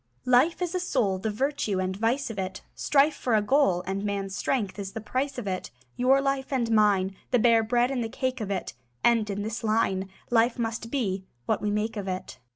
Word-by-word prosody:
Life 265 +9 +4
is 350 0 -2
a 365 - 0
soul; 235 - 0
The 220 - -2
virtue 225 -3 -1
and 185 0 -1
vice 230 +5 0
of 205 - -6
it. 190 0 -4
Strife 295 +1 +3
for 245 -5 0
a 215 - +4
goal, 205 -8 +3
And 195 +1 -2
man's 200 -2 -2
strength 210 -5 -1
is 195 -1 -5
the - - -4
price 260 +5 -2
of 245 - -4
it. 185 -2 -3 0.3
Your 260 +2 +4
life 275 0 -1
and 240 -4 0
mine, 200 -3 +3
The 250 - +3
bare 230 -1 +5
bread 240 +3 +1
and 250 -3 -1
the 225 - -3
cake 255 0 -2
of 205 - -3
it, 190 -10 -3 0.3
End 230 -3 +3
in 200 0 -2
this 220 +2 -4
line: 205 -4 +1 0.2
Life 235 0 +3
must 230 -1 -3
be 200 -8 -1 0.2
what - - 0
we 210 - 0
make 210 +2 -1
of 200 -1 -4
it. 185 0 -5
225 Hz, 220 wpm, -27 LUFS, 200-255 Hz, 0.3 s, bare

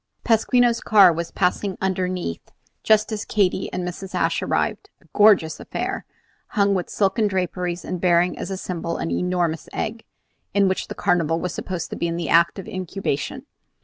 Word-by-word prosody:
Pasquino's 235 +1 +3
Car 200 -5 +6
was 170 +1 -4
passing 185 +2 -1
underneath 185 - -2 0.3
just 215 0 +3
as 215 0 -3
Katy 195 -2 0
and 180 -1 -3
Mrs. 185 +2 -7
Ashe - - +1
arrived, - - -1
a - - -26
gorgeous 205 -7 +4
affair, - - -4 0.5
hung 200 -1 +4
with 185 -2 -2
silken 210 +2 +1
draperies, 180 -2 -2
and 180 -2 -4
bearing 175 0 +3
as 190 0 -5
symbol 170 -2 -4
an 165 - -3
enormous 175 -3 -1
egg, 225 +1 -4 0.5
in 200 -1 +4
which 190 - -1
the - - -7
Carnival 165 -2 +1
was 180 - -3
supposed 180 -3 -5
to - - -3
be 170 - -1
in 170 0 -3
act 170 +3 +4
of 195 - -7
incubation. 185 - -3
185 Hz, 165 wpm, -22 LUFS, 175-200 Hz, 0.5 s, Car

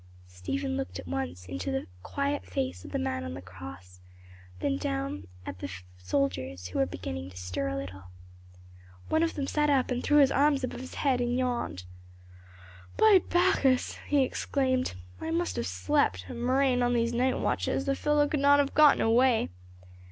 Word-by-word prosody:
Stephen 90 0 -3
looked 90 0 -4
once 90 0 -4
into 90 0 -4
the 90 0 -2 0.2
quiet 280 - -2
face 95 -9 -3
of - - -10
the - - -1
man 85 0 -2
on 85 0 -5
the - - -6
cross, 90 0 -11 0.6
then 90 - 0
down 90 +1 -3 0.2
at 90 - -6
the 95 - -5 0.3
soldiers, 90 -4 -2
who - - -3
were 90 - +3
beginning 90 0 -6
to 90 - -13
stir 90 0 -3
a 90 0 -2
little. 95 +1 -7 1.0
One 315 - +2
of 330 0 0
them 280 - -2
sat 295 +1 +1
up 265 -3 +2
and 250 0 0
threw 295 - +4
his 275 -2 +6
arms 280 -1 +3
above 255 - -3
his 260 - -9
head 260 -4 +1
and 245 0 0
yawned. 245 - -2 1.1
"By 425 -4 +7
Bacchus!" 350 -8 +2
he 285 -2 +4
exclaimed. 260 - 0 0.2
"I - - -4
must 340 +1 -1
have 115 - -1
slept, 90 0 +1
a - - -5
murrain 255 +1 +2
on 245 0 +2
these 235 0 +1
night 255 +2 +1
watches, 270 - 0
the 275 - +1
fellow 295 0 +2
could 295 - -1
not 285 +1 +6
have 285 -1 +1
gotten 300 -1 +6
away." 235 +1 +3
140 Hz, 180 wpm, -29 LUFS, -, 1.1 s, By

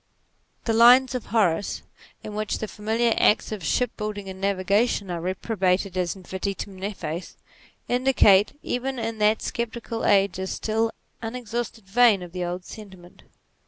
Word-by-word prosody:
The 225 - +1
lines 245 +3 +7
of 250 - -4
Horace 200 -5 +1 0.4
in 210 - -7
which 215 0 -2
the 220 - -4
familiar 220 +3 0
arts 210 - +3
of 210 -5 -5
shipbuilding 210 0 -2
and 190 0 -9
navigation 200 +1 +1
are 170 -1 -3
reprobated 185 0 -1
as 180 0 -1
vetitum 190 +1 -5
nefas, 185 -4 -5 0.5
indicate 245 -3 +4
even 260 +2 -2
in 225 -1 -4
that 210 +1 +3
sceptical 235 0 -4
age 195 -2 +3
a 190 - -3
still 225 +3 -1 0.3
unex 230 0 -6
hausted 235 -1 -3
vein 205 -1 +4
of 175 - -10
the 180 0 -4
old 175 +1 -4
sentiment. 190 -5 -12
210 Hz, 145 wpm, -25 LUFS, 190-230 Hz, 0.5 s, lines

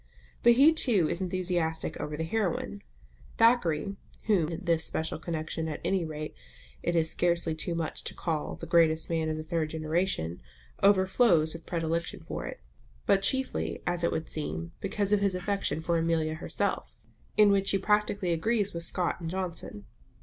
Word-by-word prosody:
But 235 - +7
he 285 +7 +7
too 215 - +3
is 170 - -2
enthusiastic 175 -3 -1
over 150 0 -4
the 160 - -1
heroine. 200 +2 -2 0.6
Thackeray 195 -6 +3 0.3
(whom 185 -8 +2
in 175 +2 -6
this 165 -2 +2
special 160 0 -2
connection 160 -1 -3
at 155 - -4
any 190 -2 +1
rate 155 -1 -5 0.5
it 175 - -1
is 160 -1 +2
scarcely 170 -2 +1
too 170 +2 -3
much 165 -1 -3
to - - -2
call 160 -3 -2
the - - -8
greatest 165 -1 +3
man 160 -1 0
of 155 - -2
the 155 - -4
third 160 -1 -1
generation) 155 - -1 0.4
overflows 190 -4 +4
with 165 0 -10
predilection 165 -1 -2
for - - -4
it, - - -8 0.4
but 195 - +4
chiefly, 265 +6 -1
as 175 -1 -1
it 170 - +2
would 160 - -2
seem, 165 +2 -4
because 200 +1 0
of 210 - +4
his 200 -2 +1
affection 180 -5 -1
for 170 0 +1
Amelia 165 -1 +1
herself, 160 - -2 0.4
in 210 -1 +7
which 195 0 +2
he 195 - +3
practically 200 -2 +1
agrees 205 +4 0
with 170 - -3
Scott 175 +1 0
and 165 - -3
Johnson. 175 - -4
170 Hz, 170 wpm, -29 LUFS, 160-195 Hz, 0.6 s, But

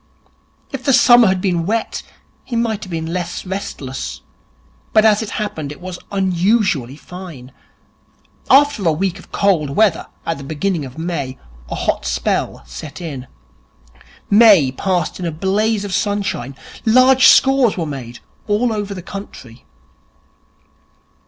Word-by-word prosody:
If 270 -2 -5
the 275 - +2
summer 240 -2 +7
had 190 -1 +1
been 175 -3 0
wet, 225 +2 -1 0.4
he 245 - -6
might 225 -2 -1
have - - -12
been 165 -1 -4
less 180 0 -4
restless. 135 - -5 0.7
But, 215 0 +5
as 215 -1 +4
it 220 - -5
happened, 160 -10 -4
it 150 - -10
was 180 -1 -7
unusually 190 - +1
fine. 160 -6 -10 1.0
After 285 -5 +5
a - - +5
week 190 +3 -2
of - - -17
cold 180 -8 +1
weather 190 +4 +2 0.2
at 165 -3 -2
the - - -8
beginning 155 +2 -2
of 130 +1 -11
May, 160 -6 -4 0.3
a - - -3
hot - - -1
spell - - -1
set 60 - -9
in. 140 -7 -6 1.0
May 205 - +6
passed 175 +5 -2
in 180 - -4
a - - -2
blaze 205 +6 0
of 195 - -5
sunshine. 195 - -2 0.3
Large 255 +3 +6
scores 265 -5 +5
were 170 - -1
made 125 -5 -7 0.3
all 220 +3 +1
over 205 -2 -4
the 180 - -8
country. 135 - -10
185 Hz, 145 wpm, -18 LUFS, 150-215 Hz, 1.0 s, summer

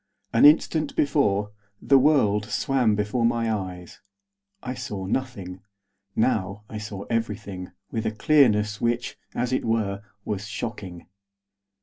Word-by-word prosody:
An 115 - +6
instant 155 0 +4
before, 105 -9 +1 0.3
the 135 -1 +5
world 115 -8 +3
swam 120 -1 +1
before 105 +4 -1
my 115 -1 +1
eyes. 90 -4 -6 0.6
I 125 - -3
saw 100 -6 -5
nothing. 95 -5 -3 0.5
Now 105 -4 0
I 110 - -6
saw 105 -2 -6
everything, 105 -5 -3 0.2
with 110 -1 -2
a - - 0
clearness 110 -4 +3
which, 120 +1 -1 0.2
as 125 +1 -1
it 130 - 0
were, 110 -4 0 0.2
was 105 -1 -3
shocking. 105 -5 -6
110 Hz, 125 wpm, -25 LUFS, 100-125 Hz, 0.6 s, An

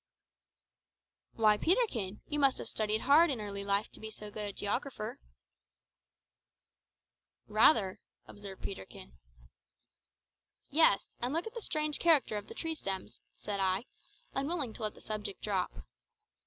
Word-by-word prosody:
"Why, 215 -2 +4
Peterkin, 245 - +1
you 295 - -2
must 275 -2 +4
have - - -6
studied 215 0 0
hard 310 +5 +6
in 265 -5 -1
early 200 -1 -4
life 200 +1 +1
to - - -3
be 220 - -6
so 210 -1 -9
good 210 0 -4
a - - -4
geographer." 215 +2 -3 2.3
"Rather," 215 -2 +4 0.3
observed 200 -2 -10
Peterkin. 80 - -7 1.6
"Yes; 290 -9 +4
and 250 +5 -1
look 335 - 0
at 450 - -7
the 470 - -6
strange 305 -5 +1
character 315 -10 +4
of 205 0 -4
the - - -10
tree 325 -1 -2
stems," 195 -10 -5
said 205 -1 -4
I, 190 +3 +1 0.5
unwilling 275 -3 -1
to - - -10
allow 215 - +1
the - - -17
subject 210 -2 -5
to - - -22
drop. 190 - -2
215 Hz, 140 wpm, -32 LUFS, 200-285 Hz, 2.3 s, hard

